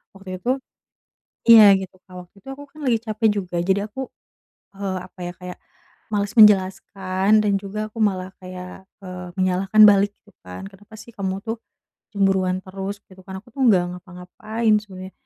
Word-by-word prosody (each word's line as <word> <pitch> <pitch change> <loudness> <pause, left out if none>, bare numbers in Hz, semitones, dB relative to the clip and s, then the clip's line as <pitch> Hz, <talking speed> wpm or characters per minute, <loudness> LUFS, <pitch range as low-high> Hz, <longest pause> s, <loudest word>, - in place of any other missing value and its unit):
waktu 185 -1 -8
itu 245 - 0 1.0
iya 215 -3 +9
gitu 185 -1 -9
Kak, 185 - -18
waktu 180 - -53
itu 195 - -23
aku 285 - -11
kan 305 0 -14
lagi 230 -3 +2
capek 220 0 0 0.2
juga 175 -1 -6
jadi 195 +3 0
aku, 265 +4 -6 0.7
eee, 195 -2 -3
apa 185 - -27
ya 175 - -5
kayak 180 0 -9 0.5
males 205 0 -1
menjelaskan 195 0 +4
dan 205 - +1
juga 215 +2 -5
aku 225 - -12
malah 190 -3 0
kayak, 185 0 -10 0.2
eee, 180 -1 -8
menyalahkan 190 +3 +3
balik 205 0 +3
gitu 205 - -23
kan, 90 - -9
"Kenapa 205 +3 -18
sih 235 - -13
kamu 190 -1 -3
tuh 225 0 -3 0.6
cemburuan 190 -2 +1
terus?" 195 +1 -6
Gitu 190 0 -18
kan, 190 -1 -7
"Aku 245 - -20
tuh 275 - -5
gak 185 -4 +4 0.2
ngapa-ngapain 210 +5 -2
sebenernya." 190 -2 -11
195 Hz, 170 wpm, -22 LUFS, 185-215 Hz, 1.0 s, iya